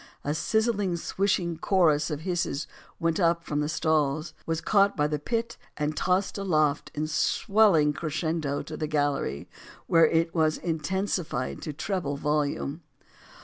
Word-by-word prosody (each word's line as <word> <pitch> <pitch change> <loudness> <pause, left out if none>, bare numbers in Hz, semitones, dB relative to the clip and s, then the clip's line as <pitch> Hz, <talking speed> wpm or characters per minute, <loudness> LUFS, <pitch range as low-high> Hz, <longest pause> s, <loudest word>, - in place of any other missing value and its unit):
A 145 - -1
sizzling, 205 +2 0
swishing 175 -2 -1
chorus 160 -7 +3
of 150 -1 -4
hisses 170 -5 -2 0.3
went 165 +1 0
up 170 -1 +2
from 150 -2 -2
the 150 0 -1
stalls, 155 0 0
was 165 -1 0
caught 200 +2 +3
by 150 - +2
the 150 0 -1
pit, 230 +8 -2 0.2
and 150 +1 -1
tossed 185 +4 0
aloft 155 -6 +1
in 150 +1 -1
swelling 160 0 +3
crescendo 155 -1 -2
to - - -7
the 155 - -3
gallery, 145 - -1 0.4
where 165 -1 +5
it 165 +1 +1
was 155 -2 +2
in 165 -2 -2
tensified 175 -6 -2
to 155 - -4
treble 150 -2 -3
volume. 150 +1 -1
160 Hz, 145 wpm, -27 LUFS, 150-180 Hz, 0.4 s, where